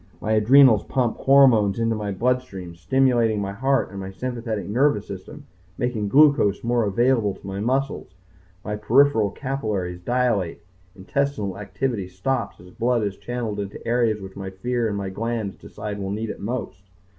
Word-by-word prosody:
My 110 - -3
adrenals 115 +1 +6
pump 125 -4 0
hormones 125 -8 +5
into 115 -1 0
my 105 -1 -3
bloodstream, 100 -5 -2
stimulating 115 +3 +2
my 100 -1 -3
heart 130 +2 0
and 100 - -7
my 95 0 -6
sympathetic 115 0 -4
nervous 115 -1 +2
system, 145 +10 -9 0.3
making 115 -4 -1
glucose 140 -6 +4
more 120 -1 +1
available 115 0 +2
to - - -16
my 95 0 -5
muscles. 130 -3 -2 0.5
My 105 0 -3
peripheral 115 -1 +3
capillaries 105 -10 -3
dilate. 120 -6 0 0.3
Intestinal 105 -1 -2
activity 105 -1 -3
stops 100 +6 -3
as 90 +1 -14
blood 120 +1 0
is 100 -2 -2
channeled 110 0 -4
into 100 0 -5
the - - -12
areas 115 -2 +1
which 95 0 -9
my 95 -1 -6
fear 120 +5 -2
and 100 -2 -2
my 100 -1 -3
glands 110 -1 -3
decide 105 -1 -7
will 95 -1 -4
need 110 +3 -3
it - - -9
most. 110 -4 -4
110 Hz, 165 wpm, -23 LUFS, 100-125 Hz, 0.5 s, adrenals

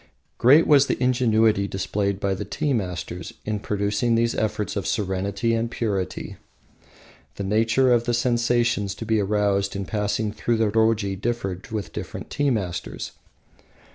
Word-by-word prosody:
Great 140 +7 +6
was 140 -2 +5
the - - 0
ingenuity 115 -5 +3
displayed 100 0 -2
by 100 -1 0
the 95 - -4
tea 150 -3 -1
masters 90 -5 -4
in 105 -1 -2
producing 105 +3 0
these 115 0 +2
effects 105 -1 -2
of 100 -5 -2
serenity 100 +2 -1
and 115 0 0
purity. 100 -6 -3 1.0
The 100 - -4
nature 115 +5 +3
of 120 -1 +2
the 120 - 0
sensations 120 -4 +1
to 115 - -7
be 110 -1 +2
aroused 100 -1 +1
in 100 0 -3
passing 105 +1 -1
through 115 +2 -1
the 110 -2 +1
roji 110 -3 +2
differed 100 -6 -3
with 110 -3 -4
different - - -7
tea 145 -1 +1
masters. 95 -8 -3
110 Hz, 150 wpm, -24 LUFS, 100-120 Hz, 1.0 s, Great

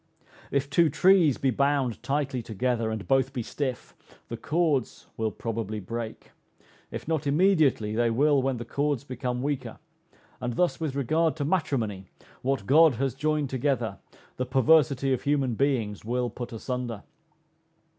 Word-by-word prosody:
If 140 0 0
two 155 +3 +3
trees 170 -2 +4
be 135 - +1
bound 140 -2 0
tightly 140 -3 -1
together, 115 +1 -1
and 110 -2 -5
both 135 0 +2
be 125 -4 -3
stiff, 130 +1 -4 0.4
the 115 - -4
cords 150 0 -1
will 110 -1 -1
probably 110 -1 -4
break; 115 +3 -6 0.6
if - - -7
not 155 -3 -1
immediately, 150 - +3
they 120 +1 +2
will 140 +4 +3
when 130 -1 -1
the 120 - -6
cords 140 +1 -1
become 125 -1 -4
weaker: 135 -5 -3 0.6
and 120 -1 -3
thus 180 +7 +1
with 155 -4 -3
regard 155 +4 +1
to 145 -3 -2
matrimony, 120 - -1 0.3
what 130 -5 -1
God 155 +1 +6
has 135 +1 -1
joined 150 0 -1
together, 125 -6 -1 0.4
the 125 - -1
perversity 135 0 +3
of 130 - -1
human 140 -4 +1
beings 115 -5 0
will 120 +1 -1
put 120 +1 -7
asunder. 120 -1 -4
130 Hz, 150 wpm, -27 LUFS, 120-145 Hz, 0.6 s, God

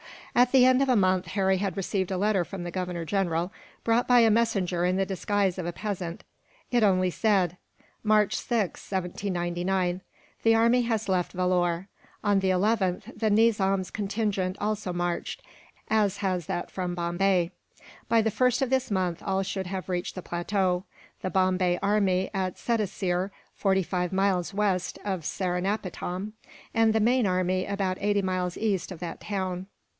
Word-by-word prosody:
At 245 0 +4
the 255 -2 +7
end 255 +1 +5
of 275 - +2
a 250 - +5
month, 185 -3 +2
Harry 190 +1 +1
had 195 -1 -2
received 190 -1 -1
a 190 - -1
letter 200 -1 +2
from 185 +1 -7
the 175 - -5
Governor 180 -2 -3
General, 175 -1 0 0.3
brought 230 +1 +2
by 245 -1 +6
a 225 -1 +5
messenger 200 -6 +1
in 180 +1 +2
the 195 0 +1
disguise 195 0 0
of 175 - -3
a 175 - -3
peasant. 185 -4 -4 0.5
It 240 -1 +3
only 185 -3 +3
said: 185 -4 +1 0.4
"March 215 -1 +3
6th, 220 -7 -2
1799. 180 -1 -1 0.4
"The 225 0 +4
army 235 +2 +4
has 225 -2 -1
left 180 -2 0
Vellore. 180 0 +1 0.4
On 205 -2 +3
the 190 0 +1
11th 195 +2 0
the 220 0 0
Nizam's 200 -4 +2
contingent 200 -3 -1
also 205 -2 -2
marched, 175 0 -3 0.5
as 205 -3 +2
has 185 -5 -1
that 175 - -3
from 180 -2 -3
Bombay. 175 +1 +1 0.6
By 230 - +4
the 220 - +1
1st 250 +3 +2
of 265 - -1
this 265 -1 +1
month 185 -4 -1
all 195 -1 0
should 190 -1 -3
have 190 0 -5
reached 180 -1 -2
the 185 - -6
plateau 180 +1 0 0.4
the 185 - -2
Bombay 185 -1 +2
army 195 -2 +2
at 185 -2 -2
Sedaseer, 195 -5 -1 0.2
forty 190 -1 +1
five 180 0 -2
miles 190 -2 +1
west 195 -3 0
of 190 -5 -2
Seringapatam; 185 +2 -2 0.4
and 225 -1 +4
the 220 - +3
main 240 0 +3
army 185 0 +1
about 195 -2 -1
eighty 205 0 +1
miles 185 -1 -1
east 200 -4 -1
of 175 - -7
that 170 -2 -5
town. 185 -2 -3
190 Hz, 165 wpm, -27 LUFS, 180-210 Hz, 0.6 s, the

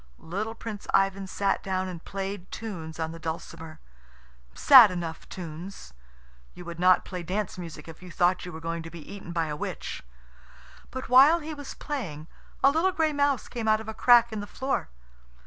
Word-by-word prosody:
Little 210 +7 -4
Prince 215 -3 -7
Ivan 195 0 +1
sat 195 +1 0
down 190 -1 -2
and 175 -3 -7
played 195 -1 -5
tunes 165 -8 -6
on 160 0 -2
the 165 - -9
dulcimer 160 -1 -6 0.8
sad 255 -6 +9
enough 170 -3 -5
tunes. 170 - -8 0.6
You 180 - -10
would 170 0 -7
not 185 +1 +5
play 180 -2 -5
dance 190 +4 -3
music 165 -3 -8
if 165 +1 -11
you 180 - -10
thought 180 +2 +1
you 180 - -7
were 160 - -8
going 165 0 -3
to 165 - -8
be 165 -2 -11
eaten 195 -3 -8
by 165 -1 0
a 150 -1 -4
witch. - - -5 0.9
But 260 +1 -6
while 275 +6 +7
he 310 0 -6
was 285 -2 -8
playing 175 - -5 0.4
a 275 - +7
little 330 +6 +2
gray 320 -3 +1
mouse 285 -3 +1
came 230 -3 -4
out 215 0 +4
of 220 - -9
a 220 - -4
crack 235 0 +5
in 215 - -3
the 205 - -6
floor. 265 - -2
190 Hz, 190 wpm, -27 LUFS, 165-230 Hz, 0.9 s, sad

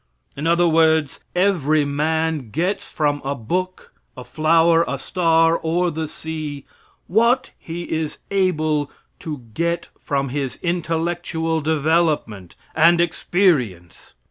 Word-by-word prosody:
In 150 +4 -3
other 170 +1 +3
words, 160 -3 +2 0.2
every 155 -6 +2
man 155 -1 -1
gets 175 - -1
from 145 -2 -1
a 140 +1 -2
book, 185 +11 -4 0.2
a 125 - -7
flower, 165 +3 +3
a 140 - -2
star, 165 +2 +2
or 175 +2 0
the 160 0 -3
sea, 155 -3 -6 0.4
what 235 +6 +2
he 170 +1 -6
is 160 -2 -3
able 155 -6 +1 0.3
to 150 -6 -6
get 170 +2 -1
from 140 -2 -2
his 135 -1 -3
intellectual 165 -1 -1
development 150 - 0 0.2
and 170 +2 +5
experience. 160 - 0
160 Hz, 115 wpm, -21 LUFS, 145-170 Hz, 0.4 s, and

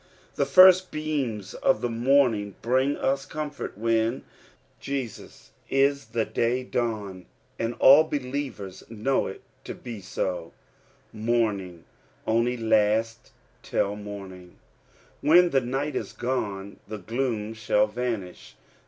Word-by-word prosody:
The 140 - 0
first 185 +4 +7
beams 135 -10 -3
of 135 - +1
the - - 0
morni 115 -4 +2
bring 130 +4 +2
us 135 0 0
comfort 150 -9 -5
when 115 +2 0 0.6
Jesus 135 -5 -6 0.2
is 140 0 +2
the 115 -1 -1
day 120 +3 0
dnwn, 105 -6 -3 0.3
and 115 +1 -2
all 145 +4 +7
believers 130 -9 -5
know 115 +4 0
it 95 - -9 0.2
to - - -7
be 120 -4 -8
Houming 95 +2 -4 0.4
only 115 +2 +1
lasts 110 0 +1 0.3
till 100 +1 -1
morning: 95 -3 -9 0.6
when 175 +3 +5
the 135 - +3
night 135 +4 -2
is - - -4
gone 100 -6 -3
the 110 +1 -5
gloom 110 +1 -2
shall 110 -1 +2
vanish. 105 -4 -5
115 Hz, 115 wpm, -26 LUFS, 105-135 Hz, 0.6 s, first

